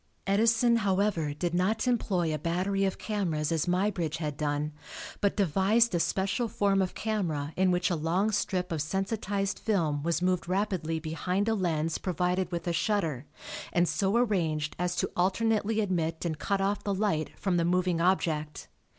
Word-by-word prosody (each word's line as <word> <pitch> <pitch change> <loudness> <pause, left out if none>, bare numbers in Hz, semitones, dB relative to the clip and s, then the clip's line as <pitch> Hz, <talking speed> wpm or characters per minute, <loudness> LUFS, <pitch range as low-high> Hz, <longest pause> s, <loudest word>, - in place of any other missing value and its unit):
Edison, 230 +4 +3
however, 195 -6 +1
did 170 +4 -2
not 205 +7 +1
employ 185 -9 +1
a 155 - -2
battery 185 +5 0
of 190 - -1
cameras 170 -8 -1
as 165 0 0
Muybridge 180 -3 0
had 150 -3 -3
done, 150 0 -1 0.5
but 200 -1 +1
devised 200 +5 +3
a 175 - +2
special 195 +7 0
form 200 -2 +1
of 185 - -2
camera 165 -9 -2
in 190 0 +3
which 180 0 +1
a - - +2
long 175 +7 +1
strip 185 -3 -1
of 160 -3 -1
sensitized 195 +3 -2
film 165 -9 0
was 170 +2 0
moved 180 -1 0
rapidly 185 -4 -1
behind 180 +6 -2
a 225 - +3
lens 165 -5 -1
provided 180 0 -1
with 170 0 -4
a 170 - +1
shutter, 165 - -1 0.4
and 175 0 +2
so 195 +3 0
arranged 165 -10 0
as 180 0 0
to - - -1
alternately 215 +4 +1
admit 170 -5 -1
and 160 -3 -2
cut 200 -1 0
off 200 +1 0
the 200 -1 -1
light 185 -6 -1
from 190 -3 0
the 170 - +2
moving 180 0 +1
object. 160 -4 0
180 Hz, 170 wpm, -29 LUFS, 165-200 Hz, 0.5 s, Edison